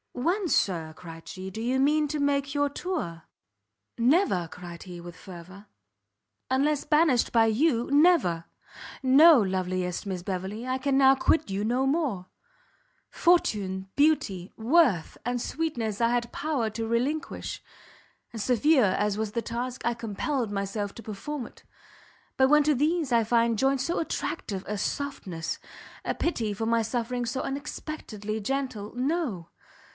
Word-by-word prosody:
"When, 355 +10 0
Sir," 165 - +1
cried 165 -1 -11
she, 190 0 -7
"do 220 +4 -6
you 250 +3 0
mean 300 +2 +3
to 300 0 -2
make 280 -1 0
your 285 0 +1
tour?" 280 - -4 0.7
"Never!" 240 - +3
cried 175 0 -9
he, 180 -2 -9
with 170 0 -10
fervour, 185 +3 -12 0.8
"unless 280 +3 +1
banished 300 -5 +3
by 225 -1 +5
you, 235 +1 +2
never! 285 - +4 0.6
no, 280 +3 +7
loveliest 185 -2 -1
Miss 190 -3 -3
Beverley, 190 +6 -4
I 255 0 0
can 270 0 +1
now 270 0 +6
quit 315 +1 +1
you 195 +1 -2
no 245 +4 +1
more! 270 - -1 0.8
Fortune, 195 - +1
beauty, 220 - +1
worth 230 - +3
and 245 0 -1
sweetness 240 -11 -2
I 230 - +4
had 240 0 -1
power 285 -7 -1
to 225 +1 -4
relinquish, 260 +8 -2 0.7
and 225 - -5
severe 260 +3 +4
as 210 -1 0
was 220 -1 -2
the 235 - -1
task, 245 +2 -4
I 235 - +2
compelled 235 +2 -2
myself 200 0 -3
to 230 - -10
perform 235 +6 -5
it, - - -19 0.7
but 265 - +5
when 300 0 +6
to 300 0 +3
these 305 +1 +1
I 230 -1 +4
find 230 0 +2
joined 270 +3 +2
so 335 +6 -1
attractive 205 - -3
a 210 - -2
softness, 195 - -3 0.4
a - - -1
pity 230 -11 -1
for 225 +3 -3
my 230 0 +2
sufferings 240 +1 -2
so 260 - -2
unexpectedly 270 -6 -5
gentle 240 -2 -3
no! 255 - -2
235 Hz, 150 wpm, -27 LUFS, 200-285 Hz, 0.8 s, no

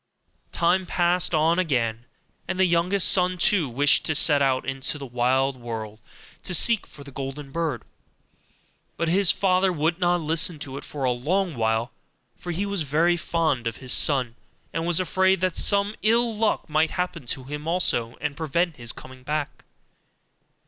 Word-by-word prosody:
Time 180 +2 +1
passed 175 +1 +2
on 165 +2 +2
again, 120 -9 -1 0.4
and 185 - -3
the 190 - +4
youngest 180 +2 +2
son 180 -1 +2
too 175 -5 +2
wished 140 +4 +3
to 155 - -1
set 145 -1 +5
out 130 -1 +1
into 135 +2 -2
the 140 - -7
wide 130 +2 0
world 110 -3 -7 0.4
to 180 - +1
seek 230 +5 +3
for 140 - -14
the 140 - -12
golden 135 +1 -7
bird; 160 -6 -3 1.1
but 170 - -1
his 180 +1 +4
father 190 -1 +1
would 165 +1 -1
not 175 -1 +2
listen 160 +1 +1
to 135 -2 -8
it 140 - -7
for 145 -2 -7
a 130 - +2
long 170 +8 -1
while, 110 0 -1 0.5
for 175 - -6
he 185 +4 -2
was 200 -3 -2
very 160 +4 +2
fond 160 -7 -1
of 115 - -3
his 130 -1 -2
son, 130 -5 +1 0.4
and 165 +1 -2
was 175 -1 +3
afraid 190 +1 +2
that 185 -1 -1
some 200 +1 +3
ill 230 +1 +2
luck 220 +1 0
might 155 +1 +1
happen 175 -7 -4
to 130 - -3
him 150 +3 -7
also, 125 -9 0
and 145 - -3
prevent 165 +1 -1
his 120 -1 -2
coming 130 0 -13
back. 150 +2 -4
160 Hz, 175 wpm, -24 LUFS, 135-180 Hz, 1.1 s, set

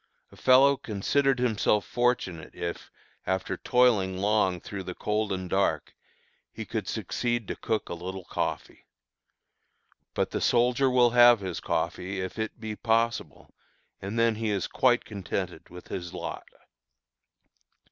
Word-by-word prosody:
A - - -15
fellow 135 +2 +5
considered 130 +6 0
himself 110 -3 +1
fortunate, 120 -9 -1
if, 85 0 -5 0.4
after 95 0 -1
toiling 110 -7 +2
long 100 -2 +1
through 100 +3 -7
the 90 -1 -7
cold 105 0 -1
and 95 -1 -3
dark, 95 +2 0 0.6
he - - -7
could - - -4
succeed 120 -3 -2
to - - -3
cook 110 -1 -2
a - - -5
little 90 +2 -6
coffee. - - -4 1.3
But - - 0
the - - -2
soldier 125 +2 +3
will 125 -2 +4
have 120 -2 +7
his 95 -3 -4
coffee, 95 +2 -2
if 95 +4 -5
it 110 +1 -4
be 110 -1 -5
possible, 115 - -1 0.5
and 100 +4 -5
then 115 0 +3
he 110 -1 -1
is 100 -2 0
quite 125 -1 +2
contented 95 -4 -5
with 90 +1 -12
his 90 -2 -5
lot. - - -6
105 Hz, 140 wpm, -27 LUFS, 95-120 Hz, 1.3 s, have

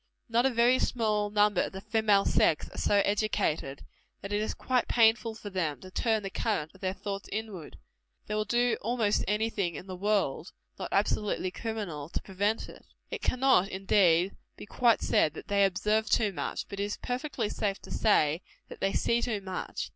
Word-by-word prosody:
Not 235 +3 +3
a - - +2
very 245 +1 +3
small 215 -3 0
number 205 -2 +3
of - - -3
the 190 - -6
female 215 -1 +2
sex 155 - +2
are - - -10
so 205 - +2
educated, 200 -9 -1 0.4
that 200 +1 -5
it 205 - +1
is 215 - -2
quite 255 -2 0
painful 225 -1 +3
for 210 -2 -8
them 165 -6 -2
to 185 - -11
turn 220 +1 0
the 195 - -5
current 160 -9 -1
of 190 - -19
their 190 0 -2
thoughts 195 -1 -5
inward: 205 -6 -6 0.5
they 210 - -5
will 215 0 +1
do 240 +2 +1
almost 225 -2 +1
any 215 +3 0
thing 180 -6 -2
in 160 - -7
the 185 -1 -7
world, 190 -5 -1 0.3
not - - -4
absolutely 200 -2 0
criminal, 195 -10 -5
to - - -3
prevent 205 +3 -1
it. - - -13 0.3
It - - -4
cannot, 255 -7 +3
indeed, 190 -2 +3 0.2
be - - -9
quite 235 +1 +2
said, 155 - +2
that - - -10
they 200 0 +3
observe 210 +3 0
too 215 -4 +2
much; - - -3
but 200 - -7
it - - +1
is 205 - -4
perfectly 250 -2 -3
safe 200 -2 -2
to - - -11
say, 165 -6 +2 0.3
that - - -10
they 195 - 0
see 235 0 +1
too 225 -4 -1
much. 190 -2 -5
205 Hz, 195 wpm, -29 LUFS, 190-225 Hz, 0.5 s, Not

